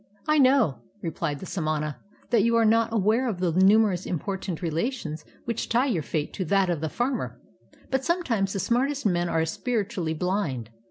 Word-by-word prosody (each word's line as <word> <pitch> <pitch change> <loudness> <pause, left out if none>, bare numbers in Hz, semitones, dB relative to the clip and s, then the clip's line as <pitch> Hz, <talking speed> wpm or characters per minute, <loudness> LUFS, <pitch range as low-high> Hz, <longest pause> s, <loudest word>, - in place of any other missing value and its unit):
"I 305 0 +4
know," 260 - +4 0.2
replied 160 -3 -3
the - - -6
samana, 155 -5 -2 0.3
"that 235 -3 +5
you 230 +2 +3
are 230 -1 +4
not 225 +1 +3
aware 225 +4 +2
of 195 -5 -3
the 180 -2 +1
numerous 190 +1 +4
important 185 0 -3
relations 165 - -2 0.2
which 235 -1 -3
tie 240 +3 +3
your 215 - 0
fate 150 0 -3
to 185 - -3
that 190 +1 +2
of 165 -4 -2
the 160 - -1
farmer; 245 - -2 0.5
but 265 0 +1
sometimes 245 - 0
the 195 - -2
smart 240 +8 +1
est 285 -3 -4
men 175 0 0
are 160 -1 +1
spiritually 185 -3 -2
blind. 155 - -2
195 Hz, 180 wpm, -26 LUFS, 165-235 Hz, 0.5 s, that